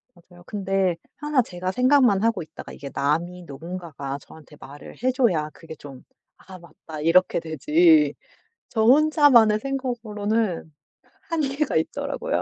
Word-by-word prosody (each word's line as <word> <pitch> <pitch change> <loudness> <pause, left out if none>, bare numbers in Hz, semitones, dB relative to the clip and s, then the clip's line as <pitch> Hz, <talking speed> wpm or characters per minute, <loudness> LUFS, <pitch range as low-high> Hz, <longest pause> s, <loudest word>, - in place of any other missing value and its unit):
맞아요. 175 0 -19
근데 195 -3 0 0.2
항상 295 -4 +1
제가 185 -2 -5
생각만 250 -3 +3
하고 225 -5 +1
있다가 160 -1 -10
이게 140 - -9
남이 170 +6 -1
누군가가 150 -2 -7
저한테 155 -1 -16
말을 145 +2 -12
해줘야 235 - +1
그게 160 -1 -11
좀 140 -3 -12 0.3
'아 190 -1 -13
맞다.' 160 -2 -11
이렇게 170 +4 +3
되지. 305 - +3 0.6
저 220 -2 0
혼자만의 265 -5 +5
생각으로는 225 -8 -2 0.6
한계가 300 -3 -1
있더라고요. 280 - -2
195 Hz, 300 characters per minute, -23 LUFS, 165-260 Hz, 0.6 s, 혼자만의